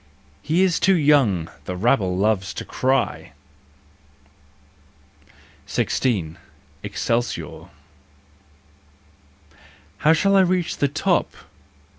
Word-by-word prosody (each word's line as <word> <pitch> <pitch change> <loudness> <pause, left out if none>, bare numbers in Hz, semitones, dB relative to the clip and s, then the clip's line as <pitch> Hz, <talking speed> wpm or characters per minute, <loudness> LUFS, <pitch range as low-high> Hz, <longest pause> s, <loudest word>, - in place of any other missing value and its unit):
" - - -32
He 175 +4 +4
is 180 -3 +1
too 190 0 +3
young! 140 - +3
" - - -29
the 90 - -4
rabble 95 -3 +1
loves 95 -2 0
to - - -6
cry. 130 -1 -1 2.3
16. 95 -11 -1 0.4
Excelsior. 120 +1 -3 1.0
" - - -30
How 155 - +4
shall 195 +5 +2
I 195 - +6
reach 180 -2 0
the 140 - +1
top 165 +6 0
135 Hz, 100 wpm, -22 LUFS, -, 2.3 s, I